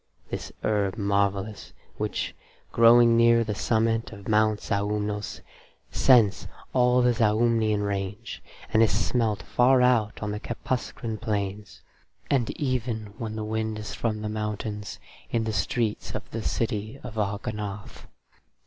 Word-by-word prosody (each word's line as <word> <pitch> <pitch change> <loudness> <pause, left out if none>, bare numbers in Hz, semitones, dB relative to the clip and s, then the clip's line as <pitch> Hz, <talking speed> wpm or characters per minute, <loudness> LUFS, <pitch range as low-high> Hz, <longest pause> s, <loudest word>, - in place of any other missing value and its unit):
(This - - -5
herb 105 -1 0
marvellous, 100 0 -1 0.2
which, - - -2 0.4
growing 115 0 +6
near 115 0 +5
the 110 -2 -2
summit 115 +2 0
of 100 -2 -11
Mount 110 -1 +3
Zaumnos, 105 +1 -2 0.5
scents 115 -7 +4 0.3
all 125 0 +4
the 125 0 +4
Zaumnian 110 -1 +2
range, 100 +2 -4 0.3
and 110 - +5
is 115 - +4
smelt 110 -1 0
far 125 +1 +4
out 115 -4 +2
on 105 - -2
the 105 - -3
Kepuscran 115 -2 -4
plains, 105 -2 -4 0.5
and 125 -5 +2
even, 120 -6 -2
when 110 -2 -4
the 110 - -3
wind 110 0 -2
is 105 0 -6
from 110 -2 -2
the - - -2
mountains, 105 -1 -4 0.3
in 115 -1 0
the 110 -1 -2
streets 105 +4 -1
of 110 - -5
the 115 - -3
city 110 +3 -2
of 110 -3 -6
Ognoth. 105 0 -4
110 Hz, 135 wpm, -26 LUFS, 105-115 Hz, 0.5 s, growing